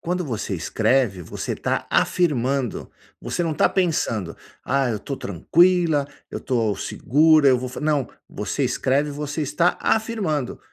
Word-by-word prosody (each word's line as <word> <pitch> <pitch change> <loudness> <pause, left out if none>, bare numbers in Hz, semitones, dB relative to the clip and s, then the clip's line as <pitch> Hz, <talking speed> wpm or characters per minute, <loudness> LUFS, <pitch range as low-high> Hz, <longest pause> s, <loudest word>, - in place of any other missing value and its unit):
quando 180 +1 -2
você 115 -7 -3
escreve, 110 +2 +1
você - - -5
tá - - -2
afirmando. 135 - 0 0.3
Você - - -3
não 165 -2 -1
tá - - +3
pensando: 115 - -1 0.3
“Ah, 135 -1 +1
eu 110 - -2
tô 140 +6 -6
tranquila. 160 - +2 0.2
Eu - - -5
tô 115 -5 0
segura. 155 +2 +3
Eu 130 -2 +4
vou 130 +1 -4
f”. 130 - -8
Não. 150 -4 0 0.2
Você - - -3
escreve, 140 +3 0
você 145 +1 -4
está 170 +5 +1
afirmando: 210 - -1
140 Hz, 145 wpm, -22 LUFS, 125-160 Hz, 0.3 s, Eu